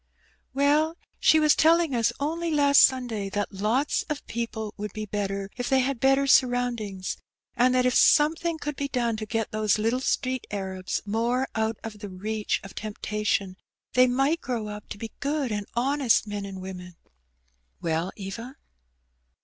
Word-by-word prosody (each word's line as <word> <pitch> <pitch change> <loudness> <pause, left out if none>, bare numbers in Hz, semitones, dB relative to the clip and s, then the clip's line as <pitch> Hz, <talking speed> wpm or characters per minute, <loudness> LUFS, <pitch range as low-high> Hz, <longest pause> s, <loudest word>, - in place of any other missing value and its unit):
"Well, 300 +4 +2 0.2
she 315 - +5
was 305 -1 +5
telling 325 -3 +4
ns 230 -2 +2
only 330 +4 -1
last 285 -2 +5
Sunday 240 -6 +2
that 205 +1 -3
lots 220 +9 +1
of 300 -1 -4
people 225 -2 -4
would 210 -1 -6
be 215 0 -4
better 200 -1 -3
if 245 - -3
tbey 265 -1 +3
had 270 -2 -2
better 270 +2 +3
surroundings; 245 -8 +1 0.4
and 255 +1 +3
that 250 0 +3
if 250 - +3
something 320 +5 +4
oonld 295 -1 -4
be 280 - -2
done 240 -4 0
to 215 0 -5
get 225 0 -2
those 215 -1 +1
little 225 +4 +1
street 260 -1 -1
Arabs 190 -2 -3
more 235 +5 0
out 220 0 -1
of 215 -2 -7
the 205 -1 -7
reach 210 +3 -2
of 195 - -10
temptation, 210 -3 -2 0.4
they 255 0 +6
night 270 +6 +1
grow 230 -4 -3
up 210 0 -8
to - - -6
be 225 +1 -7
good 285 -3 -1
and 205 -1 -3
honest 265 -1 +2
men 205 -1 -5
and 190 -1 -8
women." 180 -2 -8 0.8
"Well, 165 +3 -1
Eva?" 230 +6 -7
230 Hz, 165 wpm, -26 LUFS, 205-270 Hz, 0.8 s, they